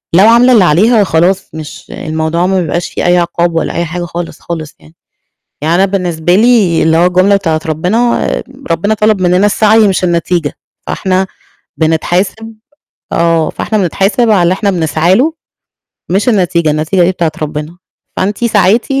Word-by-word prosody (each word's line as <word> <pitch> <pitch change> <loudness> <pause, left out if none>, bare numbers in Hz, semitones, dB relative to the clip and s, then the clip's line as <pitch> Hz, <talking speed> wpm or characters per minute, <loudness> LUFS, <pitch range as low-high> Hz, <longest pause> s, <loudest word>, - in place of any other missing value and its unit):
لو 195 +4 +6
عاملة 240 +2 +5
اللي 210 -5 +5
عليها 205 +7 +3
خلاص 185 +3 0
مش 155 -2 -9
الموضوع 160 +2 -2
ما 190 -1 +1
بيبقاش 170 +1 -3
فيه - - -4
أي 175 0 +3
عقاب 170 -1 -1
ولا 165 - -1
أي 170 - -2
حاجة 175 +2 -5
خالص، 170 0 -6
خالص 160 -4 -7
يعني. 75 +1 -20 0.7
يعني 160 +2 +1
أنا 190 +2 +3
بالنسبة 175 -3 -1
لي 215 -6 +3
اللي 160 0 +2
هو 175 +2 +3
الجملة 185 +3 +3
بتاعة 160 -5 -1
ربنا، 185 +10 0 0.4
ربنا 200 +6 0
طلب 215 -2 +1
مننا 180 +2 +2
السعي 215 +1 +3
مش 185 -1 -1
النتيجة. 170 -2 -1 0.3
فاحنا 190 0 -1 0.5
بنتحاسب 180 +7 -1 0.6
آه، 165 -1 +1
فإحنا 220 - -3
بنتحاسب 200 - 0
على 185 -4 +3
اللي 175 +2 +2
إحنا 200 +1 -1
بنسعى 170 +1 +1
له 305 +7 +1 0.8
مش 195 +7 0
النتيجة، 175 -7 +1
النتيجة 155 +5 0
دي 175 - +3
بتاعة 170 -3 -2
ربنا. 150 +2 -5 0.4
فأنتِ 205 +5 -2
سعيتِ 210 0 +2
180 Hz, 160 wpm, -12 LUFS, 165-200 Hz, 0.8 s, لو